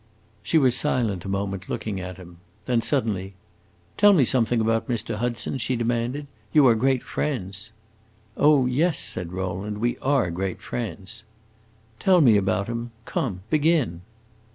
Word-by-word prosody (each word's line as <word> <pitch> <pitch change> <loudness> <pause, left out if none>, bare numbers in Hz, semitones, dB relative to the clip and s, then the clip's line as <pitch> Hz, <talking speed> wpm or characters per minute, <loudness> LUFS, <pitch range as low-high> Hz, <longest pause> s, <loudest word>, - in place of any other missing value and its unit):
She 160 - +1
was 130 -5 +4
silent 115 - 0
a - - -4
moment, 100 -1 -3
looking 105 -3 -3
at 90 0 -7
him. 90 -2 -13 0.3
Then 120 -2 +1
suddenly 105 -8 -1 0.6
"Tell 205 0 +7
me 150 -9 +4
something 120 -1 +2
about 115 0 +1
Mr. 115 -3 -2
Hudson," 120 +3 -2
she 130 +1 -1
demanded. 120 +4 -1 0.3
"You 150 -3 +5
are 120 - +7
great 130 +3 +1
friends!" 105 -7 -4 0.7
"Oh 145 -3 +4
yes," 150 +6 +1
said 90 -2 -2
Rowland; 95 +3 -4
"we 120 +3 -1
are 130 -10 +1
great 95 +2 -3
friends." 110 -1 -6 0.8
"Tell 185 -2 +4
me 120 -9 +6
about 95 -1 +1
him. 115 +1 -4 0.2
Come, 95 -8 -3
begin!" 150 - +2
115 Hz, 150 wpm, -24 LUFS, 95-130 Hz, 0.8 s, Tell